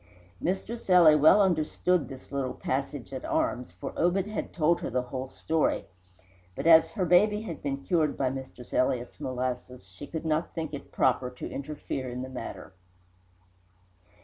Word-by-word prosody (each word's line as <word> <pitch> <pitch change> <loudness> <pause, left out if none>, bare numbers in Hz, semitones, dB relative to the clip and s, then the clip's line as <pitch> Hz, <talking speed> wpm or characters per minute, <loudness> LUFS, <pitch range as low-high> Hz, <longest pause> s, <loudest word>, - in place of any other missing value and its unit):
Mistress 195 +5 -3
Ely 175 -4 +8
well 155 +7 +6
understood 175 0 +1
this 135 -1 -11
little 135 -2 -2
passage 135 0 -3
at 130 - -5
arms, 125 -6 -1
for 90 - -7
Obed 180 +3 +2
had 210 0 -4
told 170 +1 +2
her - - -3
the 125 0 0
whole 130 +1 -5
story; 160 +4 0 0.7
but 135 - -5
as 165 -1 +7
her 195 -5 -2
baby 210 +5 +4
had 175 -7 -6
been 140 -1 -3
cured 155 -2 +1
by 130 -2 +1
Mistress 130 -2 -8
Elliott's 125 -1 0
molasses, 125 -3 -4
she 90 +10 -11
did 160 -1 -5
not 160 +1 -1
think 160 -2 -4
it 145 - -7
proper 125 0 +2
to 125 - -7
interfere 140 -2 -5
in 125 +1 -5
the 130 - -7
matter. 125 -6 -7
145 Hz, 165 wpm, -28 LUFS, 130-170 Hz, 0.7 s, Ely